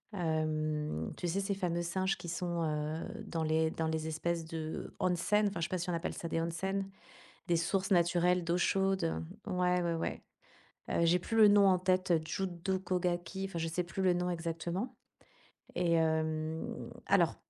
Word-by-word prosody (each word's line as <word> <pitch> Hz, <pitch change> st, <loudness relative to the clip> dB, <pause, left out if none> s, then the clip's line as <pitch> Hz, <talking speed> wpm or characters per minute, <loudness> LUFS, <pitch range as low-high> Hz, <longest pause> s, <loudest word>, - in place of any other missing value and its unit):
Hem, 155 Hz, -, -1 dB
tu 175 Hz, -, -2 dB
sais 180 Hz, +4 st, 0 dB
ces 200 Hz, 0 st, -1 dB
fameux 175 Hz, -3 st, -1 dB
singes 185 Hz, +3 st, 0 dB
qui 175 Hz, -, -7 dB
sont, 170 Hz, 0 st, -1 dB
heu, 155 Hz, +1 st, -3 dB
dans 165 Hz, -1 st, -2 dB
les 160 Hz, 0 st, +2 dB
dans 160 Hz, -1 st, -1 dB
les 160 Hz, 0 st, -1 dB
espèces 165 Hz, +1 st, -1 dB
de 160 Hz, -1 st, -5 dB
onsen 190 Hz, +4 st, +2 dB
enfin, 200 Hz, -4 st, -3 dB
je -, -, -1 dB
sais -, -, -6 dB
pas 185 Hz, -, -1 dB
si 175 Hz, +2 st, -3 dB
on -, -, 0 dB
appelle 170 Hz, +1 st, -2 dB
ça 170 Hz, -, -5 dB
des 165 Hz, -, -1 dB
onsen, 190 Hz, +4 st, -2 dB, 0.6 s
des 175 Hz, -, +3 dB
sources 190 Hz, +4 st, 0 dB
naturelles 175 Hz, 0 st, +3 dB
d'eau 170 Hz, +1 st, +1 dB
chaude, 195 Hz, +1 st, +2 dB, 0.4 s
heu, -, -, -3 dB
ouais, 180 Hz, 0 st, +2 dB
ouais, 170 Hz, -1 st, 0 dB
ouais. 165 Hz, -, -3 dB, 0.7 s
Heu, 170 Hz, -, +2 dB
j'ai 170 Hz, +2 st, +5 dB
plus 225 Hz, +5 st, -3 dB
le 215 Hz, -2 st, +8 dB
nom 205 Hz, -1 st, +6 dB
en 185 Hz, -1 st, +4 dB
tête, 185 Hz, 0 st, +1 dB
heu, 165 Hz, -2 st, +5 dB
Judo 185 Hz, +1 st, -2 dB
Kogaki, 180 Hz, +1 st, -1 dB
enfin, 170 Hz, -, -5 dB
je 165 Hz, -, -1 dB
sais 165 Hz, +2 st, -1 dB
plus 185 Hz, +2 st, -4 dB
le 185 Hz, -1 st, +4 dB
nom 180 Hz, 0 st, 0 dB
exactement, 170 Hz, +6 st, -3 dB, 0.8 s
et 175 Hz, -1 st, +2 dB
hem, 160 Hz, -1 st, 0 dB, 0.2 s
alors, -, -, +3 dB
175 Hz, 190 wpm, -33 LUFS, 160-185 Hz, 0.8 s, le